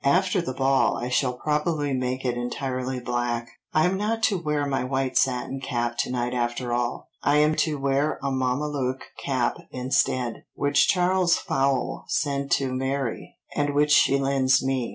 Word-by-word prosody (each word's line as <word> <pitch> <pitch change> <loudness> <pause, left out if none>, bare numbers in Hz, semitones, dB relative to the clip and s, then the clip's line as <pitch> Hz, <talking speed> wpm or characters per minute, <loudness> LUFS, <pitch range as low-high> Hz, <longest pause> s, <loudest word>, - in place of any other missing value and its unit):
After 180 +6 +3
the 130 -7 -5
ball 135 0 +2
I 120 - -3
shall 125 0 +1
probably 150 +1 -1
make 130 0 -2
it 125 -1 0
entirely 130 +1 -3
black." 120 -1 -2 0.2
"I 155 0 +3
am 185 +1 +1
not 225 +3 -1
to 205 -3 +3
wear 150 -2 0
my 135 -2 -1
white 130 0 -1
satin 130 +1 +1
cap 120 -3 -2
to - - 0
night 125 0 -1
after 120 0 -1
all; 120 0 -2
I 145 - +3
am 150 +1 +4
to 155 -2 +1
wear 140 +2 0
a 140 - 0
mamalouc 130 0 -1 0.2
cap 130 -3 0
instead, 125 -1 0
which 145 0 +3
Charles 180 -1 +3
Fowle 135 -1 -1
sent 140 -1 -1
to 135 -2 +1
Mary, 130 -1 -3 0.2
and 145 -1 0
which 150 +1 +3
she 140 -2 +5
lends 135 -1 +2
me. 130 -3 0
135 Hz, 170 wpm, -25 LUFS, 125-145 Hz, 0.2 s, she